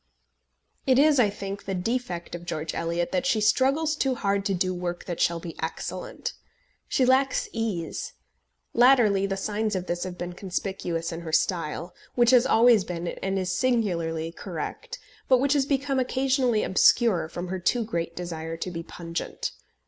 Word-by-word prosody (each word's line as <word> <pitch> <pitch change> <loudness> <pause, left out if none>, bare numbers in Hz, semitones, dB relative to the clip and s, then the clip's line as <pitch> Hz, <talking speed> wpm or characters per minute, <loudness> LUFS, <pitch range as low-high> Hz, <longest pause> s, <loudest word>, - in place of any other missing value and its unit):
It 260 -1 +5
is, 290 0 +5
I 220 -4 +5
think, 200 0 -6
the 195 - -2
defect 185 -3 -3
of 175 0 -6
George 155 -1 -3
Eliot 170 +1 -1
that 270 -1 0
she 225 - +2
struggles 275 +8 +2
too 270 -3 0
hard 200 -3 0
to 200 - +1
do 185 +1 0
work 175 -1 -4
that 175 -2 -4
shall 170 0 +2
be 165 -1 -8
excellent. 165 - -4 0.5
She 260 - +2
lacks 265 +1 +3
ease. 215 -8 -3 0.6
Latterly 230 -6 +5
the 195 0 -2
signs 210 +1 -1
of 185 -1 -2
this 175 -1 -2
have 180 -1 -6
been 175 0 -5
conspicuous 180 -3 -3
in 165 0 -5
her 165 -2 -6
style, 170 0 0 0.2
which 240 0 +5
has 250 0 +6
always 230 -4 +5
been 175 -1 -4
and 195 0 -3
is 185 -1 -1
singularly 170 -10 0
correct, 170 -1 -6 0.3
but 260 - +6
which 280 +2 +2
has 280 -2 +2
become 275 -1 0
occasionally 255 -3 +1
obscure 190 -3 +4
from 175 +2 -5
her 190 0 -3
too 230 +7 +1
great 170 -6 -3
desire 165 -2 -5
to 180 +2 -4
be 165 -1 -4
pungent. 170 0 -5
195 Hz, 170 wpm, -26 LUFS, 175-245 Hz, 0.6 s, has